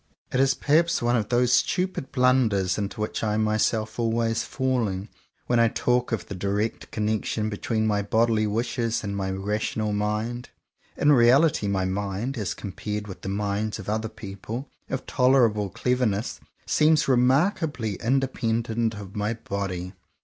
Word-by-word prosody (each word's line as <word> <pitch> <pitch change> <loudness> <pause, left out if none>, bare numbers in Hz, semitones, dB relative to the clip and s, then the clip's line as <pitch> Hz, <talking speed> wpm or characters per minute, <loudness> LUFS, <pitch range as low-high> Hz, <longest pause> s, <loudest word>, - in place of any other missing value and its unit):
It 130 - +2
is 135 0 +4
perhaps 165 +3 +2
one 120 +1 +2
of 110 -3 -1
those 125 0 +3
stupid 180 -1 0
blunders 120 -8 +2
into 100 +1 -4
which 105 - -3
I 105 -1 +1
am 110 - +2
myself 110 +1 0
always 115 0 +1
falling, 115 -7 -1 0.4
when 120 -1 +2
I 115 - +5
talk 125 +2 0
of 115 - -2
the - - -7
direct 100 +4 -2
connection 110 0 -1
between 110 +1 -1
my 105 -1 +1
bodily 110 +1 +2
wishes 115 +2 -1
and 100 -1 -3
my 95 -1 -2
rational 105 +2 -2
mind. 105 +4 -2 0.5
In 145 - +4
reality 130 -1 +5
my 95 -2 0
mind, 100 +6 -2
as 105 -7 -3
compared 105 +2 -5
with 95 - -9
the 95 - -5
minds 100 +1 -1
of 105 -2 -7
other 110 +1 -1
people 110 +4 -7 0.2
of 130 - -3
tolerable 120 -6 +3
clever 125 +5 0
ness, 105 +2 -2 0.3
seems 155 0 +3
remarkably 130 - +2
independent 115 -3 0
of 100 -2 -9
my 105 +2 -1
body. 95 -4 -4
110 Hz, 155 wpm, -25 LUFS, 105-125 Hz, 0.5 s, I